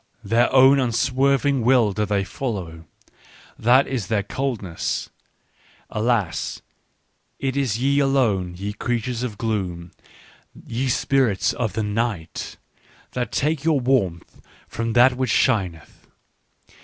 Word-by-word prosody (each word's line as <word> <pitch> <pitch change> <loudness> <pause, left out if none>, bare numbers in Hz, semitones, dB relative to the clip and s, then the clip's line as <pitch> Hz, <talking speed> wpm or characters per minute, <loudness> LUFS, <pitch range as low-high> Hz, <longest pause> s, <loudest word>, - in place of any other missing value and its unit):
Their 115 +4 +2
own 135 +1 +6
unswerving 135 +2 +1
will 120 -3 +4
do 105 +1 -1
they 100 -1 0
follow: 95 -9 -5 0.7
that 125 +4 +5
is 120 -8 -3
their 110 -3 0
coldness. 105 -7 -3 0.4
" - - -32
Alas, 110 -4 -1 0.7
it 135 -1 -2
is 130 -6 0
ye 140 +3 +2
alone, 115 -11 +1
ye 100 +2 -4
creatures 120 +1 -2
of 120 -5 -4
gloom, 95 -7 -3 0.7
ye 130 +3 -2
spirits 125 -5 +1
of 115 -4 -2
the 110 - -1
night, 105 -7 -3 0.5
that 125 -1 -3
take 150 0 0
your 160 -3 +2
warmth 120 -10 -1 0.3
from 115 0 -3
that 125 +2 +5
which 130 -1 -1
shineth. 95 - 0
115 Hz, 120 wpm, -22 LUFS, 100-130 Hz, 0.7 s, own